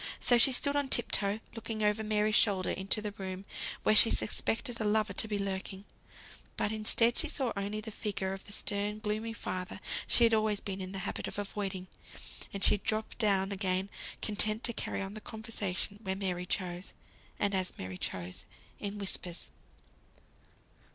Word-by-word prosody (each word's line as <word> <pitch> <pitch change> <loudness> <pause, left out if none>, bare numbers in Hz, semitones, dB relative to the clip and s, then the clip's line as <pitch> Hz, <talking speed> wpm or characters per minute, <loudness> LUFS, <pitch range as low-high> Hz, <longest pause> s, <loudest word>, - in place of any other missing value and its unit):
So 245 -1 +5
she 270 - +9
stood 280 +3 +4
on 285 -2 +1
tip 240 - +5
toe, 205 +2 +1
looking 225 -1 -4
over 210 +1 +2
Mary's 215 0 +1
shoulders 195 -4 +3
into 195 +3 +1
the 210 -1 -3
room 190 0 -5 0.4
where 215 - +4
she 225 - +9
suspected 230 +2 0
a - - +1
lover 215 -1 +1
to 220 - +2
be 210 -1 -1
lurking; 195 0 -4 0.7
but 205 - 0
instead, 220 +2 +4
she 320 - +2
saw 270 -5 -1
only 200 +2 -3
the 220 - -7
figure 195 -2 -3
of 195 - -8
the - - -9
stern, 205 +1 -1
gloomy 215 +1 -2
father 185 -3 -5 0.3
she 240 - +6
had 230 -1 +5
always 215 -2 +2
been 195 -2 -5
in 185 0 -5
the 195 - -5
habit - - -3
of - - -6
avoiding; 195 -2 -3 0.7
and 200 0 -5
she - - +6
dropped 215 +3 -2
down 195 -3 +2
again, 190 -1 -1 0.3
content 215 +1 +3
to 235 - 0
carry 195 - -2
on 195 +1 -6
the 215 - -7
conversation 210 -3 -3
where 190 -3 -2
Mary 180 -2 -3
chose, 180 -1 -2 0.4
and 200 0 +1
as 185 -1 -2
Mary 95 0 -6
chose, 90 0 -4 0.3
in 205 0 -4
whispers. 185 -3 -3
205 Hz, 180 wpm, -32 LUFS, 190-220 Hz, 0.7 s, she